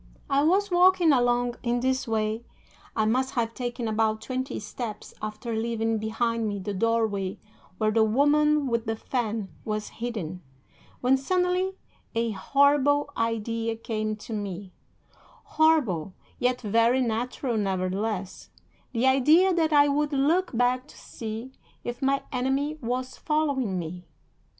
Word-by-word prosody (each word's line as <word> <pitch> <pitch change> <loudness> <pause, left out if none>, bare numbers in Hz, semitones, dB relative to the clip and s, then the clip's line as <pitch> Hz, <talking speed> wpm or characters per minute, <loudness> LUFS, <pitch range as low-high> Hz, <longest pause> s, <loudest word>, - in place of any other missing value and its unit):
"'I 275 +1 +4
was 390 +4 +2
walking 355 -2 +5
along 245 -2 +2
in 240 0 0
this 260 +1 0
way 220 0 -1 0.5
I 220 - +2
must 255 +4 0
have 230 -2 0
taken 240 -1 -3
about 220 0 +1
twenty 255 +4 -4
steps 210 0 -6
after 215 +2 -4
leaving 225 0 -1
behind 225 +1 -1
me 205 - -3
the 200 +1 -4
doorway 205 -2 0 0.4
where 215 -1 +1
the 220 0 +4
woman 295 +6 +3
with 235 -2 -1
the 225 - 0
fan 220 -4 -2
was 215 -1 -3
hidden, 190 -8 -4 0.6
when 255 +2 +4
suddenly 365 +5 0 0.4
a 230 0 +1
horrible 285 +5 +3
idea 230 0 -1
came 215 -1 -3
to 215 +2 -9
me 200 -2 -5 0.8
horrible, 250 - +2 0.2
yet 250 0 +1
very 230 +4 +3
natural 240 +1 -1
nevertheless 195 0 -2 0.4
the 235 +1 +1
idea 305 +8 +5
that 325 -2 +2
I 290 -1 +6
would 295 +1 0
look 295 +1 +1
back 250 +2 +1
to - - -16
see 225 +3 -7 0.3
if 240 +2 -5
my 275 0 +1
enemy 270 +4 0
was 255 +2 -3
following 280 -10 0
me. 175 +1 -6
235 Hz, 135 wpm, -26 LUFS, 215-275 Hz, 0.8 s, I